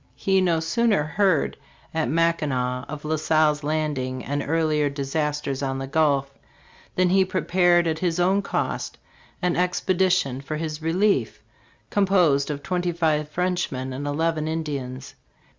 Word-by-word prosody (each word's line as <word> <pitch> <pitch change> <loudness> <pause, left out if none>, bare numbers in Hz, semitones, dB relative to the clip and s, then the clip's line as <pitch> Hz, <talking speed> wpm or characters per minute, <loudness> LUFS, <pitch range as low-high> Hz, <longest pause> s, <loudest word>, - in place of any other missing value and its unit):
He 190 -1 +2
no 170 -3 +2
sooner 205 +2 +1
heard 165 +1 +1 0.4
at 160 -6 0
Macki 165 0 +1
nac 125 -1 -2
of 150 0 -7
La 155 +1 0
Salle's 155 -1 +2
landing 145 -5 -2
and 145 +2 -2
earlier 155 -2 +1
disasters 145 0 -2
on 135 -1 -2
the 135 - -4
Gulf, 140 -1 +1 0.6
than 185 0 +3
he 190 +1 +4
prepared 175 -2 +2
at 160 -1 -1
his 175 -1 0
own 190 +3 +3
cost - - -3 0.5
an 180 -1 +1
expedition 180 -5 +1
for 155 +2 -5
his 155 -1 -4
relief, 185 +6 +1 0.5
composed 180 -9 +3
of 145 -1 -4
twenty 180 +2 -1
five 155 -3 0
French 180 +2 -1
men 130 0 -4
and 140 +3 -4
eleven 155 +1 0
Indians. 140 -5 -4
155 Hz, 145 wpm, -24 LUFS, 145-175 Hz, 0.6 s, he